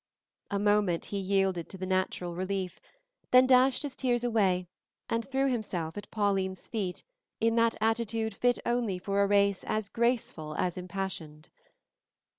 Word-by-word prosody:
A 200 Hz, -, -1 dB
moment 205 Hz, -4 st, +2 dB
he 200 Hz, -, -3 dB
yielded 190 Hz, -3 st, 0 dB
to 190 Hz, -, -8 dB
the 185 Hz, -, -4 dB
natural 185 Hz, -2 st, -1 dB
relief, 185 Hz, 0 st, -3 dB, 0.5 s
then 255 Hz, +1 st, +7 dB
dashed 255 Hz, +2 st, +4 dB
his 285 Hz, -3 st, -5 dB
tears 245 Hz, -2 st, 0 dB
away 195 Hz, -6 st, +2 dB, 0.5 s
and 230 Hz, 0 st, +1 dB
threw 270 Hz, +2 st, 0 dB
himself 190 Hz, -10 st, -2 dB
at 205 Hz, -, -7 dB
Pauline's 195 Hz, -3 st, 0 dB
feet 195 Hz, -6 st, -3 dB, 0.4 s
in 225 Hz, 0 st, +2 dB
that 230 Hz, 0 st, +3 dB
attitude 225 Hz, 0 st, 0 dB
fit 245 Hz, +4 st, +2 dB
only 235 Hz, -5 st, 0 dB
for 200 Hz, +2 st, 0 dB
a 200 Hz, -, +4 dB
race 200 Hz, -1 st, +3 dB
as 215 Hz, -2 st, -2 dB
graceful 230 Hz, -11 st, -1 dB
as 180 Hz, +2 st, 0 dB
impassioned. 180 Hz, -4 st, -5 dB
200 Hz, 150 wpm, -30 LUFS, 185-230 Hz, 0.5 s, then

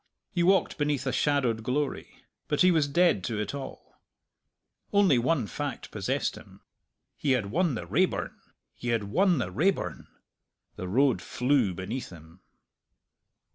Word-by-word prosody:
He 175 Hz, -, 0 dB
walked 190 Hz, -1 st, +2 dB
beneath 145 Hz, -3 st, 0 dB
a 130 Hz, -, 0 dB
shadowed 130 Hz, -6 st, +1 dB
glory. 135 Hz, +5 st, -3 dB, 0.2 s
But 150 Hz, -1 st, 0 dB
he 185 Hz, 0 st, +6 dB
was 155 Hz, -4 st, +2 dB
dead 170 Hz, -, +3 dB
to 110 Hz, -2 st, -2 dB
it 105 Hz, -, -3 dB
all. 140 Hz, -2 st, -9 dB, 0.9 s
One 200 Hz, -4 st, +4 dB
only 130 Hz, +1 st, +2 dB
fact -, -, -5 dB
possessed -, -, -1 dB
him. -, -, -14 dB, 0.5 s
He 140 Hz, -3 st, +1 dB
had 105 Hz, -6 st, -1 dB
won 170 Hz, -1 st, +1 dB
the -, -, -5 dB
Raeburn -, -, 0 dB, 0.4 s
he 120 Hz, -, -8 dB
had 115 Hz, -2 st, +1 dB
won 175 Hz, -, +2 dB
the 110 Hz, -8 st, -2 dB
Raeburn! 170 Hz, -, -1 dB, 0.7 s
The 90 Hz, -, -6 dB
road 130 Hz, +7 st, +2 dB
flew 125 Hz, -7 st, +1 dB
beneath 105 Hz, +8 st, -5 dB
him. 80 Hz, +1 st, -15 dB
135 Hz, 145 wpm, -28 LUFS, 110-155 Hz, 0.9 s, he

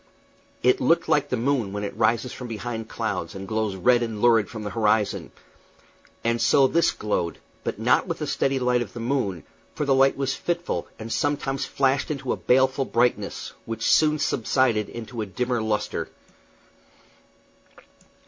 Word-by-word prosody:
It -, -, +4 dB
looked -, -, +3 dB
like -, -, +2 dB
the -, -, 0 dB
moon 120 Hz, -5 st, 0 dB
when 105 Hz, 0 st, -3 dB
it 100 Hz, -, -4 dB
rises 115 Hz, +2 st, +1 dB
from 125 Hz, -, -7 dB
behind 115 Hz, 0 st, -5 dB
clouds, 100 Hz, -5 st, -3 dB
and 95 Hz, 0 st, -7 dB
glows 110 Hz, -2 st, -1 dB
red 120 Hz, +6 st, +3 dB
and 115 Hz, -3 st, -3 dB
lurid 115 Hz, -3 st, +4 dB
from 110 Hz, -2 st, -7 dB
the 105 Hz, -, -4 dB
horizon; 105 Hz, 0 st, +1 dB, 0.9 s
and 115 Hz, 0 st, +1 dB
so 140 Hz, -, +5 dB
this 165 Hz, +5 st, +3 dB
glowed, 90 Hz, -5 st, -2 dB, 0.3 s
but -, -, -3 dB
not -, -, +2 dB
with -, -, -2 dB
the -, -, -3 dB
steady 135 Hz, 0 st, 0 dB
light 125 Hz, -1 st, +2 dB
of 110 Hz, -5 st, -5 dB
the 120 Hz, -, -7 dB
moon, 115 Hz, -, -1 dB, 0.3 s
for 150 Hz, -, -1 dB
the 140 Hz, -, +3 dB
light 135 Hz, 0 st, +4 dB
was 135 Hz, -1 st, 0 dB
fitful, 175 Hz, +3 st, -2 dB
and 115 Hz, +1 st, -7 dB
sometimes 145 Hz, -2 st, -1 dB
flashed 135 Hz, 0 st, +1 dB
into 135 Hz, -4 st, -2 dB
a -, -, -1 dB
baleful 130 Hz, +1 st, +2 dB
brightness, 115 Hz, -5 st, 0 dB
which 115 Hz, 0 st, -4 dB
soon 155 Hz, -1 st, +4 dB
subsided 120 Hz, -5 st, +1 dB
into 115 Hz, 0 st, -6 dB
a 105 Hz, -, -3 dB
dimmer 120 Hz, +5 st, -1 dB
lustre. 110 Hz, -1 st, -2 dB
120 Hz, 165 wpm, -25 LUFS, 110-135 Hz, 0.9 s, so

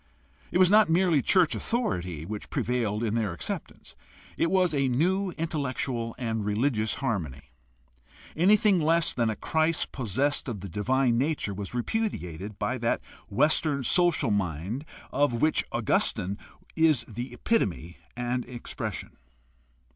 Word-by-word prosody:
It -, -, +1 dB
was 185 Hz, 0 st, +5 dB
not 215 Hz, -3 st, +6 dB
merely 170 Hz, -3 st, +3 dB
church 180 Hz, +4 st, +4 dB
authority 90 Hz, -, -2 dB
which 105 Hz, +3 st, -6 dB
prevailed 115 Hz, -3 st, -1 dB
in 110 Hz, -2 st, 0 dB
their 110 Hz, -5 st, 0 dB
acceptance; 85 Hz, -, -6 dB, 0.4 s
it 165 Hz, -, +1 dB
was 185 Hz, -2 st, +2 dB
a 140 Hz, -2 st, +2 dB
new 185 Hz, +10 st, +1 dB
intellectual 130 Hz, -7 st, -2 dB
and 115 Hz, -3 st, -2 dB
religious 110 Hz, +1 st, 0 dB
harmony. 85 Hz, -, -3 dB, 0.8 s
Anything 200 Hz, +3 st, +4 dB
less 165 Hz, +1 st, +2 dB
than 115 Hz, -2 st, +1 dB
a 110 Hz, -, -2 dB
Christ 160 Hz, +7 st, 0 dB
possessed 135 Hz, +4 st, -1 dB
of 105 Hz, -6 st, -5 dB
the 100 Hz, -, -6 dB
divine 120 Hz, +5 st, +1 dB
nature 140 Hz, -7 st, -1 dB
was 100 Hz, +4 st, -6 dB
repudiated 105 Hz, -, -3 dB
by 125 Hz, +3 st, -2 dB
that 115 Hz, 0 st, 0 dB, 0.3 s
Western 145 Hz, +3 st, +2 dB
social 165 Hz, -3 st, +3 dB
mind 100 Hz, -, -2 dB, 0.3 s
of 140 Hz, -1 st, +2 dB
which 155 Hz, +7 st, +2 dB
Augustine 100 Hz, +3 st, +1 dB, 0.4 s
is 155 Hz, -7 st, +3 dB
the 120 Hz, +3 st, -7 dB
epitome 90 Hz, -, -1 dB, 0.2 s
and 125 Hz, +1 st, -1 dB
expression. 120 Hz, -2 st, -6 dB
125 Hz, 130 wpm, -27 LUFS, 105-160 Hz, 0.8 s, not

